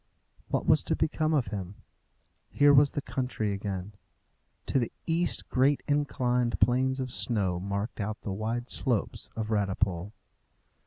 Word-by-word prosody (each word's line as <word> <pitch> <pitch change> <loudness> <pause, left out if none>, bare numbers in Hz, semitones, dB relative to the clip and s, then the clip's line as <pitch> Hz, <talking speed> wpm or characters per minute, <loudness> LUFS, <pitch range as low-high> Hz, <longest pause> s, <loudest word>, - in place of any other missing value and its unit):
What - - -1
was - - +5
to - - 0
become 155 0 0
of 140 -9 +1
him? 95 -1 -5 0.7
Here 145 0 +5
was 140 0 +5
the 145 - -3
country 125 -7 -2
again. 100 0 -4 0.7
To 135 - +1
the 120 - -2
east 170 +1 +1
great 135 +2 +2
inclined 125 -4 0
planes 130 +2 +2
of 130 -1 -3
snow 100 -9 +1
marked 100 +5 -4
out 105 +1 -4
the 100 - -4
wide 115 +4 -3
slopes 120 -7 0
of 110 0 -3
Radipole. 100 -2 0
120 Hz, 145 wpm, -28 LUFS, 100-135 Hz, 0.7 s, was